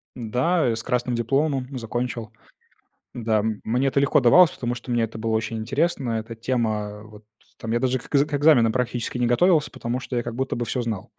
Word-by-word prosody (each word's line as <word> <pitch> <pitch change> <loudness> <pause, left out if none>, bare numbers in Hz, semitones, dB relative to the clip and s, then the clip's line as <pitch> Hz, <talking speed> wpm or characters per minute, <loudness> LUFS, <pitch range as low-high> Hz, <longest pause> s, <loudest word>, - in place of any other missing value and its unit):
Да, 125 +8 0
я 115 - +1
с 115 - -5
красным 125 -1 -1
дипломом 135 +3 0
закончил. 120 -1 -4 0.8
Да, 110 -2 0
м, 110 0 -2
мне 125 +4 0
это 135 +1 +1
легко 140 - +3
давалось, 170 +8 +6
потому 120 -1 -3
что 125 +1 -11
мне 120 -1 +2
это 110 0 -5
было 110 0 -2
очень 110 0 -1
интересно. 135 +3 -1
Эта 115 +1 -4
тема 110 -3 -2
вот, 105 0 -15 0.3
там 115 - -5
я 120 - +2
даже 130 0 0
к - - -13
к - - -2 0.2
экзаменам 140 -6 +5
практически 125 0 -2
не 120 - +1
готовился, 155 +4 +3
потому 120 +2 -3
что 130 - -6
я 120 - 0
как 120 0 -5
будто 130 +1 -2
бы 120 - -2
всё 125 +1 -2
знал. 110 -4 -5
120 Hz, 210 wpm, -23 LUFS, 115-130 Hz, 0.8 s, давалось